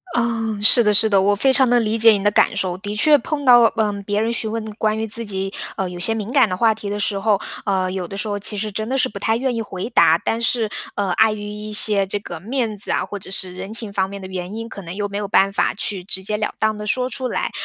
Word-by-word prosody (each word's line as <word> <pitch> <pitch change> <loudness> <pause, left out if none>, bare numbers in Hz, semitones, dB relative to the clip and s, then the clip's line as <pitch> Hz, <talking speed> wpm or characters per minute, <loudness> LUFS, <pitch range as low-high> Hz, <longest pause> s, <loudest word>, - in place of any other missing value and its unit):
啊， 230 -2 -1
是 235 +3 +7
的 210 - +3
是 210 +2 +4
的。 200 -3 +3
我 205 +1 +2
非 265 +6 +2
常 265 -2 +5
地 245 0 +4
理 220 -1 0
解 225 0 +7
你 200 -2 -1
的 205 - +3
感 - - +2
受， 180 -2 -2
的 205 +2 -5
确 295 +8 +5
碰 285 +4 -4
到， 240 -2 +7
呃， 215 -2 0
别 205 0 0
人 230 +2 0
询 220 -2 -1
问 225 -1 -4
关 215 0 0
于 220 - -2
自 230 +2 -3
己， 195 -2 -4 0.2
呃， 190 - -2
有 175 0 -8
些 225 +5 0
敏 220 +2 -5
感 265 -7 +4
的 185 - -3
话 225 +2 +3
题 210 -2 -7
的 205 0 -3
时 200 -1 -1
候， 205 -1 +1 0.3
呃， 190 -2 0
有 185 -2 -4
的 195 - -8
时 215 - -4
候 205 -1 -3
其 210 +1 0
实 215 +1 -3
真 215 +4 -4
的 270 - 0
是 - - +2
不 200 - -8
太 225 +2 +1
愿 260 0 -1
意 225 - -2
回 190 -1 -6
答。 - - +5
但 230 - -2
是， 230 -1 +1 0.3
呃， 200 -3 -1
碍 220 +3 +3
于 210 - -6
一 210 +1 -7
些 210 -2 +3
这 200 - -2
个 175 -4 -8
面 230 +2 -2
子 205 - -8
啊， - - 0
或 205 - -7
者 190 - -12
是 190 -1 -2
人 190 +3 -7
情 220 -3 -1
方 190 -1 0
面 200 - -8
的 190 - -8
原 185 +2 -6
因， 225 0 -6
可 200 - -9
能 170 0 -8
又 205 0 -2
没 200 0 -5
有 205 - -4
办 195 0 +2
法 - - 0
去 200 -2 -2
直 190 0 -2
截 210 +2 -2
了 210 - -3
当 215 0 0
地 210 0 -7
说 250 +3 0
出 255 0 -3
来。 - - -2
210 Hz, 315 characters per minute, -20 LUFS, 195-225 Hz, 0.3 s, 是